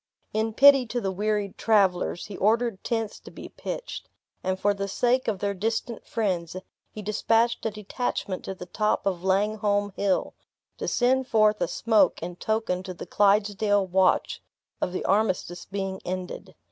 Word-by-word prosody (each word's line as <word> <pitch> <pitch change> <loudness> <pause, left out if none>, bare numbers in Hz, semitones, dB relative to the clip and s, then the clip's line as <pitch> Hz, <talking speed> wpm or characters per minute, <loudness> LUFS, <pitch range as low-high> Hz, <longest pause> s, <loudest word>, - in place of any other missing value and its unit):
In 220 0 -1
pity 275 -2 +7
to 245 +2 -2
the 195 -4 -2
wearied 205 0 -2
travelers, 190 -5 +2
he 205 - -8
ordered 225 0 +1
tents 225 -3 -2
to - - -12
be - - -10
pitched; - - -6 0.3
and 185 0 -1
for 205 +1 +2
the 200 0 -3
sake 245 +6 +1
of 215 -3 0
their 200 +1 -1
distant 225 +3 -3
friends, 185 -7 -2 0.3
he 215 - -9
dispatched 225 +3 +1
a - - 0
detachment 210 -2 -4
to 190 - -5
the 180 - -8
top 215 +3 0
of 185 -3 -1
Langholm 205 +1 +1
Hill, 200 -2 0 0.5
to - - -3
send 260 +1 +2
forth 215 -2 +3
a - - +2
smoke 215 -5 +2
in 175 +1 -5
token 215 -4 -1
to 185 -1 -7
the - - -8
Clydesdale 205 +1 +2
watch, 185 0 +2 0.4
of - - 0
the 185 - -4
armistice 190 -3 0
being 195 -1 -4
ended. 185 0 -6
205 Hz, 165 wpm, -26 LUFS, 190-220 Hz, 0.5 s, pity